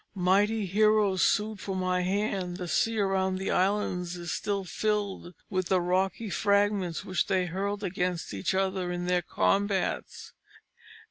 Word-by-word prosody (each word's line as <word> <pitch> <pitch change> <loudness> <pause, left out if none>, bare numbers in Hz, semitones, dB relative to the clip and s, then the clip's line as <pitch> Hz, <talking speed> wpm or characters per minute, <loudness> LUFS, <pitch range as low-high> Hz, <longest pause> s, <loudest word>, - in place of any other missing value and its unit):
Mighty 200 +4 +2
heroes 205 -1 +3
sued 210 +2 +1
for 195 -1 -4
my 185 -1 0
hand; 190 -1 -1
the 180 -2 -5
sea 225 +6 +1
around 190 -2 +1
that 190 +1 -2
island 190 -1 +1
is 170 -2 -5
still 200 -1 -2
filled 200 -2 -2
with 185 -3 -1
the 185 +1 +3
rocky 190 +4 0
fragments 200 -2 +1
which 185 - 0
they 190 -3 +1
hurled 200 +4 -3
against 180 - -2
each 100 - -1
other 190 -2 0
in 175 0 -3
their 180 0 +2
combats. 195 +2 -1
190 Hz, 145 wpm, -28 LUFS, 180-205 Hz, -, heroes